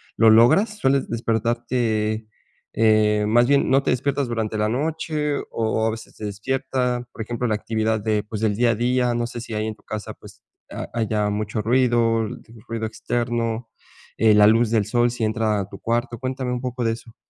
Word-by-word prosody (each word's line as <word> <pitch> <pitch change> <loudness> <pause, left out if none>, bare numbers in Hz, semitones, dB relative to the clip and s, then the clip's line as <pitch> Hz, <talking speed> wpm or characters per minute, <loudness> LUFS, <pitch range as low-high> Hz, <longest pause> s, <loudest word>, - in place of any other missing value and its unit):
¿lo 115 0 +5
logras? 155 - +5
¿Sueles 135 -6 +1
despertarte? 115 -1 -1 0.4
Eh, 110 -1 +3
más 120 +3 +4
bien, 140 +1 +3
¿no 135 +1 +3
te - - +1
despiertas 135 +1 0
durante 110 -2 -2
la 105 0 +1
noche 150 +3 -1
o - - -7
o 110 -1 0
a - - +2
veces 110 0 -9
te - - -11
despierta? 125 +3 -2
Por - - -8
ejemplo, 120 +2 -3
la 110 -3 +1
actividad 110 0 -1
de, 105 0 0
pues, 105 0 -6
del 105 -2 +1
día 120 +1 +3
a 115 - +2
día, 125 +1 +1
no 120 0 -1
sé 120 0 -7
si 115 - -8
ahí 110 0 -1
en 110 - -4
tu - - -28
casa, 110 0 -6
pues 105 0 -16 0.3
ha - - -5
haya 105 -2 0
mucho 105 +1 -2
ruido, 115 -1 +2
l - - -7 0.3
ruido 115 -1 -3
externo, 115 0 -2 0.5
eh, 110 -1 +5
la 105 0 +7
luz 115 +1 +4
del 110 -3 +2
sol 120 +2 +2
si 120 -2 -2
entra 110 -1 0
a 95 - -3
tu 100 - -10
cuarto. 120 +1 -1
Cuéntame 130 -1 -3
un 125 - -3
poco 125 -1 -3
de 115 - +2
eso. 115 0 -12
115 Hz, 205 wpm, -22 LUFS, 110-125 Hz, 0.5 s, la